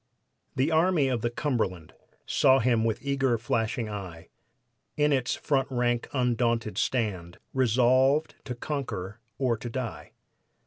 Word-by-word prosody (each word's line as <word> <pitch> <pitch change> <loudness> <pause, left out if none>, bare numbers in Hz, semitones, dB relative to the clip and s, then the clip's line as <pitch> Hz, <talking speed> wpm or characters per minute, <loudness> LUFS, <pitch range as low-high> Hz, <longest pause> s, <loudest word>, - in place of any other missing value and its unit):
The 135 +5 +1
Army 160 -3 +3
of 120 -3 -1
the 120 - 0
Cumberland 110 - -2 0.3
Saw 130 0 +4
him 120 -3 +2
with 115 +3 -1
eager, 135 -3 +1
flashing 115 0 -1
eye 95 -6 -7 0.7
In 150 -1 +3
its 130 -2 0
front 135 -3 0
rank 120 -2 0
undaunted 120 -4 0
stand, 95 -9 -1 0.2
Resolved 130 +4 +3
to 125 - -4
conquer 115 -7 -4 0.2
or 125 -4 +1
to 120 - -6
die. 120 -2 -5
120 Hz, 130 wpm, -27 LUFS, 110-135 Hz, 0.7 s, Saw